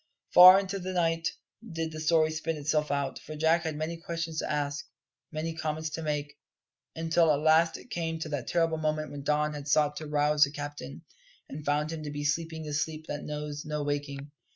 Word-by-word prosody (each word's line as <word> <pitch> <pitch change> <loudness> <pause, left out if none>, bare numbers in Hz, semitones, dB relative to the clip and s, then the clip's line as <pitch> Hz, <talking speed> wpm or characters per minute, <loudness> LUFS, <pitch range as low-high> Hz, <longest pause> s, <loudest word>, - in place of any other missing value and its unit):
Far 185 +2 +11
into 195 0 -3
the 185 0 -4
night 165 -2 +1 0.5
did 165 -1 -2
the 155 - -7
story 155 0 +3
spin 160 0 -3
itself 150 +1 0
out, 140 -1 -1
for 155 - -9
Jack 160 +2 +2
had 160 -2 -2
many 160 +2 -3
questions 165 -1 -4
to - - -2
ask, 145 -1 -2 0.4
many 160 +1 -3
comments 155 -1 -3
to 165 - -4
make; 150 -1 -3 0.6
until 165 0 +3
at 145 - +2
last 160 +1 +4
it 250 - -15
came 165 -1 -2
to 160 -1 -5
that 145 -5 -4
terrible 165 -2 +1
moment 155 -1 -1
when 145 -1 -6
Don 150 +1 +1
had 145 -1 -7
sought 150 0 +2
to 155 - -6
rouse 150 0 +1
the 140 - +2
captain, 145 - -7 0.5
and 145 +2 -7
found 150 +2 0
him 160 -1 -5
to 150 - -5
be 145 0 -4
sleeping 160 +2 -1
the 150 -1 -5
sleep 155 +1 -2
that 145 - -4
knows 150 -1 -5
no 150 -1 -3
waking. 145 0 -4
155 Hz, 205 wpm, -29 LUFS, 145-165 Hz, 0.6 s, Far